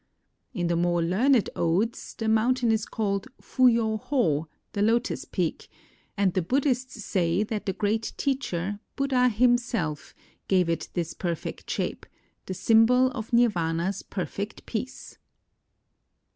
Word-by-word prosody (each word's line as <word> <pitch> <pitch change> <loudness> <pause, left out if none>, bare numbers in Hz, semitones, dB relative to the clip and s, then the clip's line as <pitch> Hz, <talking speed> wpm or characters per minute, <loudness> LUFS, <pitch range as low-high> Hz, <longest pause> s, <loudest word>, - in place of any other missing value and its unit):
In 175 -3 -1
the 170 0 +1
more 175 0 +1
learned 225 +8 +3
odes, 185 +8 -1
the 225 - -3
mountain 235 +2 +3
is 220 -1 0
called 200 -3 -2
Fuyo 230 -4 +2
Ho, 165 - +1 0.3
the 200 - -1
Lotus 230 +5 +1
Peak; - - -3 0.5
and 195 -3 +2
the 185 - +1
Buddhists 255 - -1
say 175 +1 +1
that 215 -1 -4
the 195 - +1
great 215 +3 -1
teacher, 205 -8 -2 0.2
Buddha 260 -2 +2
himself, 235 - 0 0.3
gave 185 -3 +3
it 165 -1 -2
this 170 -2 -2
perfect 170 -3 -4
shape, - - -3 0.4
the 185 - -4
symbol 240 +5 +4
of 225 -3 -6
Nirvana's 185 -6 +1
perfect 200 +2 -5
peace. 250 +3 -6
215 Hz, 130 wpm, -26 LUFS, 175-240 Hz, 0.5 s, symbol